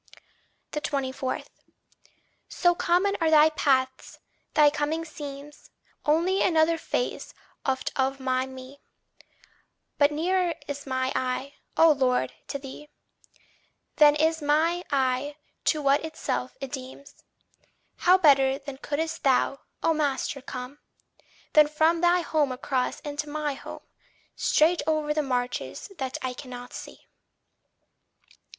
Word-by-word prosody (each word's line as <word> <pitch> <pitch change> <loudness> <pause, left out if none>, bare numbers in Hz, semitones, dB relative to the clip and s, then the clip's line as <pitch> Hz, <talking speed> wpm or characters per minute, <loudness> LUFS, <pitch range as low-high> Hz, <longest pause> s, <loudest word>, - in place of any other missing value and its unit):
24. 270 -3 -2 1.1
So 350 -1 +3
common 360 +4 +1
are 325 - +3
thy 310 0 +6
paths, 260 -4 0 0.4
thy 300 -1 +6
coming 305 +2 -2
seems 290 -1 -9 0.4
Only 340 +6 +2
another 325 -1 +3
phase - - -3 0.3
oft 265 -1 -1
of 270 0 0
my 260 0 0
me; 260 +1 -11 1.2
But 285 0 +5
nearer 350 +3 0
is 285 0 -6
my 260 0 -1
I, 260 +2 -2 0.2
O 325 0 +7
Lord, 255 - +1
to - - -3
thee, 280 +2 -10 1.1
Than 295 -1 +7
is 320 +1 +1
my 320 +4 +2
I 270 +1 0 0.3
to 305 -2 +1
what 280 +2 +3
itself 315 -5 -4
it 270 -2 -6
deems; 265 +1 -9 0.7
How 365 +1 +5
better 275 -6 +4
then 275 -1 -9
couldst 320 +3 -3
thou, 275 +1 +2 0.2
O 325 - +3
master, 285 -2 -1
come, 255 +2 -7 0.7
Than 305 -1 +7
from 315 +2 +2
thy 350 0 +4
home 305 -4 +1
across 255 0 -2
into 295 0 -4
my 300 -1 -2
home, 270 - -9 0.5
Straight 330 +3 +3
o'er 310 -1 +1
the 305 - +1
marches 250 +7 -3
that 265 -1 -3
I 255 -1 -2
cannot 245 -2 -9
see! - - -10
290 Hz, 120 wpm, -26 LUFS, 265-315 Hz, 1.2 s, O